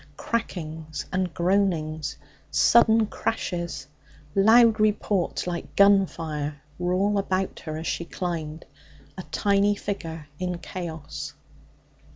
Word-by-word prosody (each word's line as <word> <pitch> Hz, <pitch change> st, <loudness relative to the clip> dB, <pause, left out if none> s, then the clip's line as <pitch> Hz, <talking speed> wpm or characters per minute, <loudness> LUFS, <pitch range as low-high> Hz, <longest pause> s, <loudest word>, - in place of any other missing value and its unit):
Crackings 160 Hz, -8 st, -4 dB
and 185 Hz, -1 st, 0 dB
groanings, 170 Hz, -4 st, 0 dB, 0.3 s
sudden 225 Hz, -1 st, +5 dB
crashes, 175 Hz, -9 st, -3 dB, 0.5 s
loud 225 Hz, +2 st, +6 dB
reports 210 Hz, -3 st, +1 dB
like 175 Hz, -1 st, -5 dB
gun 200 Hz, -1 st, +6 dB
fire, 150 Hz, -3 st, -4 dB, 0.2 s
were 180 Hz, 0 st, 0 dB
all 200 Hz, +2 st, +2 dB
about 190 Hz, -1 st, -1 dB
her 155 Hz, -2 st, -5 dB
as 160 Hz, -, -6 dB
she 170 Hz, -, -2 dB
climbed 165 Hz, -3 st, -4 dB, 0.5 s
a -, -, -6 dB
tiny 200 Hz, 0 st, +3 dB
figure 165 Hz, -7 st, -5 dB
in 180 Hz, -1 st, -2 dB
chaos. 165 Hz, -4 st, -6 dB
180 Hz, 110 wpm, -25 LUFS, 160-200 Hz, 0.5 s, loud